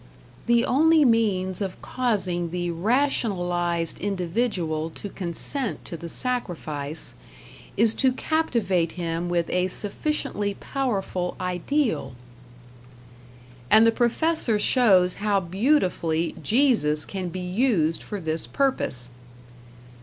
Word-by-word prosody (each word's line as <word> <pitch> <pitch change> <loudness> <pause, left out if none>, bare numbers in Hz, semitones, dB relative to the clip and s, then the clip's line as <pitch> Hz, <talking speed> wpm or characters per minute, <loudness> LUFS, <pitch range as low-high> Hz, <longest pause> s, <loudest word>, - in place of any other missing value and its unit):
"The 235 0 +4
only 315 +2 +4
means 205 -6 +1
of 190 -2 -4
causing 185 -9 -1
the 175 0 -2
rationalized 175 - 0
individual 180 -4 -1
to 205 - -7
consent 200 - -4
to - - -7
the 170 +1 -7
sacrifice... 160 - -2 0.6
is 225 +1 +5
to 260 +2 +3
captivate 235 - 0
him 170 0 -3
with 170 -1 0
a 180 0 +1
sufficiently 205 0 -3
powerful 195 -9 -2
ideal" 185 - -1 1.5
And 220 +1 +7
the 230 - +5
professor 240 +1 +1
shows 200 -5 +4
how 205 -1 +2
beautifully 180 - 0
Jesus 215 - +2
can 185 -2 -4
be 185 - -6
used 180 -4 +1
for 205 - -6
this 160 -2 -2
purpose. 130 - +2
190 Hz, 105 wpm, -24 LUFS, 170-240 Hz, 1.5 s, And